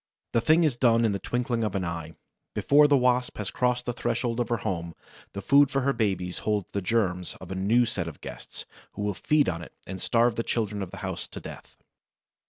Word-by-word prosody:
The 115 - +3
thing 160 +7 +4
is 145 -7 +1
done 115 -2 +4
in 110 - +2
the 100 - -2
twinkling 120 0 -1
of 105 -3 -2
an 95 -2 -1
eye; 85 -1 -5 0.4
before 145 +1 +5
the 145 -1 +5
Wasp 125 -1 +1
has 105 -2 -3
crossed 125 0 0
the 120 - -2
threshold 120 0 -1
of 120 - -1
her 120 - +1
home, 85 -5 -3 0.4
the 100 - -6
food 140 +5 +5
for 135 -1 0
her 140 +1 +1
babies 95 -6 -1
holds 105 -3 0
the 100 - -2
germs 90 -3 0
of - - -10
a - - -3
new 110 +6 +3
set 100 -7 -2
of 80 - -8
guests, - - -9 0.3
who 105 - -4
will 105 0 0
feed 150 +9 +2
on 85 -2 -2
it 85 - -11
and 95 -1 -7
starve 120 0 +2
the - - +1
children 105 -4 -2
of 95 - -4
the - - -10
house - - -4
to - - -9
death. - - -11
115 Hz, 230 wpm, -27 LUFS, 95-125 Hz, 0.4 s, before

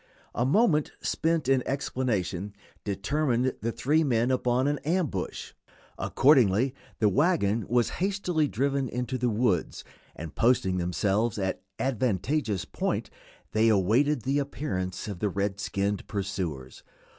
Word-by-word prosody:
A 120 +3 0
moment 155 - +3
spent 165 -4 0
in 135 -1 +3
explanation 105 -8 -2 0.3
determined 125 +5 0
the 115 - -1
three 150 +7 +2
men 120 -3 +1
upon 125 0 +1
an 145 0 0
ambush. 155 - -2 0.4
Accordingly 130 -3 +3 0.2
the 110 - +3
wagon 115 - +2
was 120 0 +2
hastily 180 -5 +1
driven 135 +1 0
into 125 +1 -3
the 125 0 +1
woods, 105 -6 0 0.3
and 80 -1 -7
posting 115 -6 +2
themselves 100 +5 0
at 95 -2 -2 0.2
an - - -2
advantageous 115 - 0
point - - -2 0.4
they 110 +1 +3
awaited 115 +7 +2
the 140 +2 +1
appearance 125 -12 -3
of 100 -4 -5
the 105 - 0
red 100 +1 -2
skinned 100 -1 -2
pursuers. 95 -10 -4
120 Hz, 130 wpm, -27 LUFS, 100-140 Hz, 0.4 s, moment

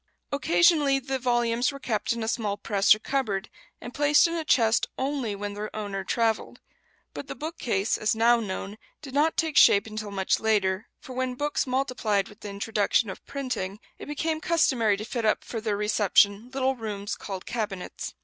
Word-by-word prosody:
Occasionally 295 -1 +3
the 265 0 -3
volumes 240 0 +1
were 280 - -8
kept 225 -5 -1
in 230 -1 -2
a - - -3
small 215 -4 -1
press 200 -1 +4
or - - -8
cupboard, 215 -5 -2 0.3
and 245 - -9
placed 295 +3 +4
in 335 - 0
a 330 -1 -2
chest 230 -6 +3
only 265 -6 -2
when 205 0 -5
their 210 +1 -5
owner 200 -2 -4
travelled; 225 +2 -1 0.5
but - - -7
the - - -6
bookcase, 245 - -2
as 215 +1 +1
now 235 +2 +4
known, 205 0 -5 0.2
did 270 -3 -9
not 300 +3 +2
take 320 -3 0
shape 200 - +7
until 215 -1 -6
much 195 -1 0
later, 205 -2 +1
for 260 - -10
when 255 0 -2
books 290 +1 -1
multiplied 250 -6 0
with 210 - -16
the 205 - -7
introduction 205 +1 0
of - - -11
printing, 250 -8 -4 0.2
it - - -9
became 315 +2 -2
customary 255 -12 +2
to 215 - -6
fit 235 0 -3
up 215 - +2
for 225 - -5
their 215 -2 -1
reception 210 +1 +2
little 265 0 0
rooms 205 -4 -5
called 190 -2 -7
cabinets. 210 -6 -5
225 Hz, 185 wpm, -26 LUFS, 205-270 Hz, 0.5 s, shape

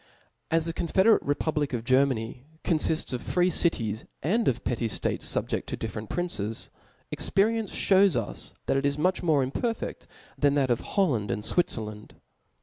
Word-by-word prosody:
As 165 0 +2
the 165 - -3
confederate 190 +7 +3
republic 145 0 -1
of 115 -2 -2
Germany 130 -2 +1 0.2
confifts 160 -4 +1
of 125 - -2
free 180 0 +1
cities, 115 - 0 0.2
and 215 - +1
of 120 -2 0
petty 120 -2 -1
ftates - - -2
fubjeft - - -1
to - - -4
different 110 -1 -5
princes, 115 - -2 0.4
experience 220 +1 +1
Ihews 195 -3 +4
us, 115 -4 -4
that - - +1
it 135 - 0
is 140 0 -1
much 185 +4 +1
more 150 -6 +2
imperfeft 225 - -3 0.3
than 145 -1 +3
that 135 -3 +2
of 120 - +2
Holland 135 - 0
and 105 - -2
Swiflerland. 105 -9 -1
145 Hz, 155 wpm, -27 LUFS, 115-180 Hz, 0.4 s, Ihews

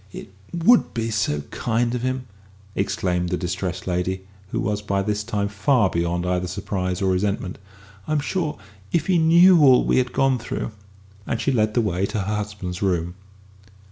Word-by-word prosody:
"It 95 - -10 0.2
would 180 +8 +3
be 115 -1 -1
so 100 -9 0
kind 120 +1 0
of 125 - -2
him!" 130 0 -2 0.5
exclaimed 95 -3 -1
the 90 - 0
distressed 90 0 -3
lady, 95 +1 -2 0.2
who - - -2
was 105 +2 -1
by 100 -1 -1
this 105 +1 -1
time 105 -2 -1
far 100 +1 +2
beyond 85 +1 -1
either 90 0 0
surprise 90 +1 -3
or 95 - +2
resentment. 95 0 -1 0.5
"I'm 155 -1 +1
sure, 160 +1 -2 0.3
if 165 -2 +1
he 180 -2 +3
knew 170 +2 +6
all 130 -3 +6
we - - +3
have 125 -1 -1
gone 135 -1 +2
through 115 - -4 0.3
!" 100 +1 -26
and 115 - -1
she 140 - +1
led 110 -4 +1
the 120 - +4
way 100 -3 0
to 105 0 -2
her 105 +2 -2
husband's 100 -4 -5
room. 90 -3 0
105 Hz, 180 wpm, -23 LUFS, 90-125 Hz, 0.5 s, knew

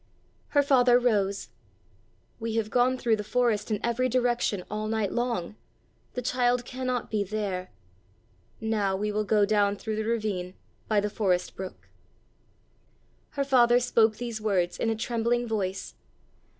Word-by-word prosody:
Her 285 - +6
father 250 -3 +5
rose. 205 -5 0 0.9
"We 225 -1 -3
have 220 -1 -1
gone 255 +1 +3
through 230 -3 +1
the 210 - -4
forest 220 -1 0
in 210 -2 0
every 245 +2 +1
direction 240 -6 +1
all 215 +1 -3
night 215 -3 -1
long; 235 -5 -2 0.6
the 250 - -3
child 245 0 +1
cannot 255 -1 -3
be 210 -2 +1
there. 195 -3 -3 0.9
Now 215 -3 0
we 210 +2 -1
will 215 0 -1
go 210 0 +3
down 205 -1 +2
through 215 +1 -4
the 220 - -1
ravine 210 -5 -2 0.3
by 210 -2 +2
the 210 - -1
forest 185 -5 0
brook." 190 -1 -8 1.5
Her 280 - +2
father 245 -3 +5
spoke 230 -3 +3
these 235 -3 -5
words 185 -5 0
in 225 - +1
a 225 - +1
trembling 235 +1 0
voice. 195 -4 -3
220 Hz, 150 wpm, -27 LUFS, 205-245 Hz, 1.5 s, Her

